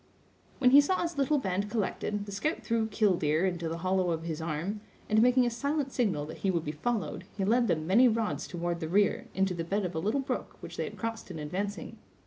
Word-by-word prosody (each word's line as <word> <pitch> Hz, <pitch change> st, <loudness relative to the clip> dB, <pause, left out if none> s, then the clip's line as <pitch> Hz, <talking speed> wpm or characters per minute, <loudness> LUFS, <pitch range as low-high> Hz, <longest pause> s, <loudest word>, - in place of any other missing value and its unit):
When 250 Hz, -2 st, +4 dB
he 285 Hz, +2 st, +9 dB
saw 370 Hz, +6 st, 0 dB
his 335 Hz, -4 st, -3 dB
little 280 Hz, +2 st, +3 dB
band 200 Hz, -4 st, -1 dB
collected, 205 Hz, -1 st, -2 dB
the 200 Hz, -, -8 dB
scout 300 Hz, -, -2 dB
threw 230 Hz, -1 st, 0 dB
"killdeer" 180 Hz, -7 st, +2 dB
into 175 Hz, -3 st, -1 dB
the 165 Hz, -, -3 dB
hollow 185 Hz, -1 st, +2 dB
of 165 Hz, -1 st, -1 dB
his 160 Hz, -2 st, -4 dB
arm, 170 Hz, +7 st, -3 dB, 0.3 s
and 215 Hz, 0 st, +4 dB
making 250 Hz, +1 st, +5 dB
a 240 Hz, -, 0 dB
silent 280 Hz, +3 st, -1 dB
signal 200 Hz, -, 0 dB
that 155 Hz, -, -8 dB
he 195 Hz, -, 0 dB
would 170 Hz, -3 st, 0 dB
be 150 Hz, -, -2 dB
followed, 205 Hz, +4 st, -2 dB
he 195 Hz, -, 0 dB
led 235 Hz, +3 st, +3 dB
them 155 Hz, -4 st, 0 dB
many 225 Hz, +9 st, +6 dB
rods 225 Hz, -2 st, -1 dB
toward 175 Hz, -1 st, -3 dB
the 160 Hz, -2 st, -4 dB
rear, 200 Hz, +3 st, +2 dB
into 195 Hz, -1 st, +1 dB
the 170 Hz, -1 st, -3 dB
bed 195 Hz, +4 st, -1 dB
of 180 Hz, -, -3 dB
a 160 Hz, -, -2 dB
little 215 Hz, +11 st, 0 dB
brook 270 Hz, -, -4 dB
which -, -, -9 dB
they -, -, -2 dB
had -, -, -8 dB
crossed 225 Hz, -2 st, -4 dB
in 175 Hz, -, -6 dB
advancing. 185 Hz, +7 st, -4 dB
200 Hz, 235 wpm, -30 LUFS, 170-235 Hz, 0.3 s, he